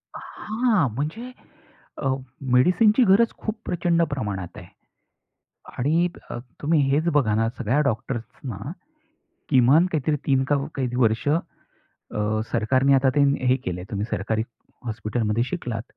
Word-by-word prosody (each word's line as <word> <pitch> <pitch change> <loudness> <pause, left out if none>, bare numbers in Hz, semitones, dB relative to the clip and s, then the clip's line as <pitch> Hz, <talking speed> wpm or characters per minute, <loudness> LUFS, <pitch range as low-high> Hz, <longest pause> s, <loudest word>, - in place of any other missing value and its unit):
हां, 215 - 0
म्हणजे, 170 - -4 0.7
अ, 135 - -2 0.5
मेडिसिनची 210 - +5
गरज 215 +4 +4
खूप 215 - -4
प्रचंड 170 -1 +1
प्रमाणात 100 -9 -4
आहे. - - -10 1.1
आणि, 160 +7 +2 0.2
अ, - - -5 0.2
तुम्ही 155 +2 +2
हेच 155 +4 +1
बघा 130 -8 +3
ना, 115 +1 +2
सगळ्या 125 +5 +1
डॉक्टर्सना, 120 0 -5 0.9
किमान 135 +6 +5
काहीतरी 155 -1 +1
3 135 -1 +3
का 145 - +1 0.2
काही 125 -3 -2
वर्ष, 115 0 +2 0.6
अ, 105 +1 -3
सरकारने 130 +5 +3
आता 135 0 +4
ते - - +5 0.3
हे 130 - +4
केलंय, 90 0 -4
तुम्ही 100 -1 -2
सरकारी 110 +4 -1 0.4
हॉस्पिटलमध्ये 110 0 -1
शिकलात, 125 -7 -4
130 Hz, 125 wpm, -24 LUFS, 110-165 Hz, 1.1 s, मेडिसिनची